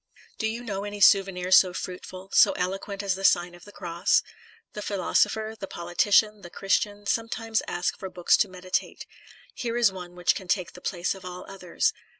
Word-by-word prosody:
Do 220 - 0
you 230 +2 -4
know 200 -4 -4
any 205 0 -6
souvenir 190 -2 +4
so 185 -1 +6
fruitful, 185 +1 -7
so - - +6
eloquent 195 +2 -3
as 195 -2 +1
the 190 +1 -6
Sign 175 -2 +3
of 175 - -15
the 205 - -13
Cross? 180 +1 +1 0.5
The 210 - -6
philosopher, 210 +2 0
the 195 - -5
politician, 200 +5 +2
the 175 - -10
Christian, 205 +2 -1
sometimes 225 0 -1
ask 175 0 -2
for 190 - -6
books 175 -1 +3
to - - +2
meditate; 185 0 -3 0.5
here 235 -1 -3
is 235 -4 +4
one 180 -2 -9
which 180 0 +2
can 190 - -8
take 185 -1 -1
the 180 - -13
place 175 -1 -2
of 190 0 -12
all 180 0 -8
others. 195 - -1
195 Hz, 185 wpm, -26 LUFS, 180-205 Hz, 0.5 s, so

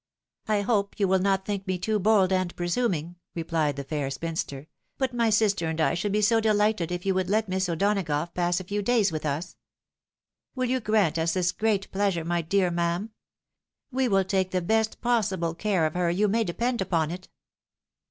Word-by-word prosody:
" - - -66
I 210 -1 +2
hope 200 -1 0
you 200 - +3
will 190 0 +3
not 195 0 +1
think 200 -1 -3
me 185 -1 0
too 210 +4 -1
bold 195 -2 +3
and 185 -1 0
presuming," 175 -3 -1 0.2
replied 160 -3 0
the 140 - -5
fair 140 -1 -3
spinster; 140 -1 -4 0.2
" - - -50
but 260 -2 -1
my 235 -2 +2
sister 205 -5 +2
and 160 0 -3
I 155 - +3
should 180 +4 -1
be 210 +1 +1
so 225 +2 +4
delighted 210 -5 +1
if 180 +1 -4
you 195 - +2
would 185 -1 -1
let 215 +1 +1
Miss 190 0 -1
O'Donagough 170 -3 0
pass 175 0 +1
a - - -6
few 205 +3 -2
days 210 -3 +2
with 155 -1 -3
us. 155 +5 -4 1.0
Win 255 -1 -1
you 260 - +1
grant 210 -8 +1
us 165 0 +1
this 180 -1 +1
great 210 -2 -1
pleasure, 190 -4 0
my 170 0 0
dear 180 +2 +1
ma'am? 170 +5 -1 0.8
We 260 0 +1
will 195 -3 +3
take 190 0 0
the 185 - 0
best 220 +5 0
possible 200 -9 0
care 185 -1 0
of 155 - -1
her, 180 -1 +1
you 195 +5 +2
may 225 +3 +2
depend 235 +6 -1
upon 165 -4 0
it." 185 +1 -7
190 Hz, 205 wpm, -26 LUFS, 170-210 Hz, 1.0 s, so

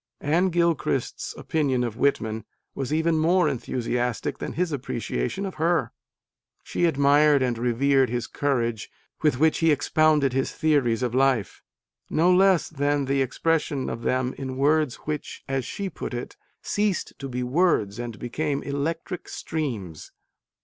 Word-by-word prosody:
Anne 170 +6 +2
Gilchrist 165 -7 0
s - - -5
opinion 135 -6 0
of 115 -3 -3
Whitman 110 -5 0 0.3
was 135 0 -4
even 160 +1 +2
more 175 +2 +3
enthusiastic 125 -3 -2
than - - -4
his 180 0 -1
appreciation 120 - -3
of 190 - -5
her. 165 -7 +2 0.7
She 175 - 0
admired 145 -2 +4
and 125 -2 0
revered 130 +2 +2
the 120 -1 -1
courage 120 -6 -1 0.3
with 150 -5 +2
which 155 +3 +3
he 165 - +3
expounded 150 -1 +3
his 135 0 -1
theories 135 -6 +1
of 120 -2 -1
life, 130 -5 +1 0.5
no 175 +4 +3
less 190 -1 +4
than 145 -1 0
the 135 +1 +1
expression 145 +1 0
of 115 - -5
them 130 +1 0
in 130 -1 -5
words 150 -1 +2
which, 150 -1 -5
as 135 -2 -1
she 200 - -4
put 155 - -6
it, 120 - -6 0.3
ceased 205 -3 -1
to 135 - -5
be 125 0 -3
words 125 - +1
and 120 -2 -5
became 140 +5 -2
electric 160 +5 -3
streams. 115 - -5
140 Hz, 150 wpm, -25 LUFS, 125-160 Hz, 0.7 s, admired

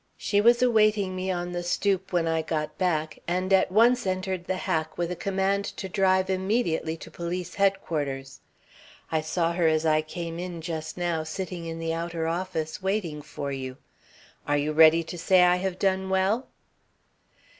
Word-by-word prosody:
She 205 -1 +1
was 235 +2 +5
awaiting 215 -5 +3
me 185 +1 -3
on 175 -1 -2
the 175 0 -3
stoop 190 +2 0
when 175 -2 +1
I 160 0 +1
got 155 -1 -3
back, 160 -4 0
and 185 +2 0
at 190 -1 +4
once 235 +2 +4
entered 185 -1 -2
the 185 - 0
hack 160 -3 -2
with 175 0 -1
a - - -2
command 195 +1 0
to 190 - -4
drive 190 -1 +2
immediately 185 -4 0
to - - -11
Police 175 +1 -4
Headquarters. 150 -9 -1 0.7
I 160 -1 +1
saw 165 +2 0
her 170 -1 +2
as 155 0 +2
I 155 -1 +3
came 165 +1 -6
in 175 -1 -5
just 160 -1 -5
now 175 -2 0
sitting 170 +1 -5
in 165 0 -5
the 165 0 -2
outer 165 0 -3
office, 165 -2 -3
waiting 190 -6 -2
for 145 -1 -6
you. 130 -1 -5 0.7
Are 145 - +2
you 150 +1 -1
ready 160 +1 +6
to 175 +1 -7
say 185 +1 +5
I 180 0 +5
have 185 0 -2
done 190 0 0
well?" 190 +6 +1
175 Hz, 175 wpm, -26 LUFS, 160-190 Hz, 0.7 s, ready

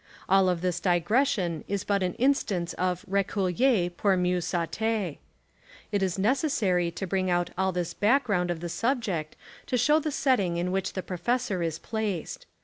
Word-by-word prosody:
All 190 0 +4
of 175 -2 -1
this 180 -1 -1
digression 180 - +1
is 200 -1 -2
but 200 -1 0
an 180 -1 -1
instance 215 -10 +1
of 180 +1 -2
reader 195 0 0 0.6
pour 190 +2 +1
mieiix 180 0 +1
saiiter. 185 +1 -2 0.7
It 205 -2 0
is 185 -3 0
necessary 205 - +1
to 170 +3 -5
bring 185 0 0
out 175 0 +1
all 190 +1 +1
this 175 -1 -3
back 255 +8 +3
ground 180 -6 0
of 170 -2 -3
the 175 - -3
subject 215 - -1 0.3
to 250 - 0
show 295 +6 +4
the 310 - -2
setting 205 - +1
in 175 +1 -1
which 190 0 -1
the 185 - -4
professor 195 +2 -1
is 165 -2 -1
placed. 210 -6 -4
190 Hz, 170 wpm, -27 LUFS, 175-220 Hz, 0.7 s, All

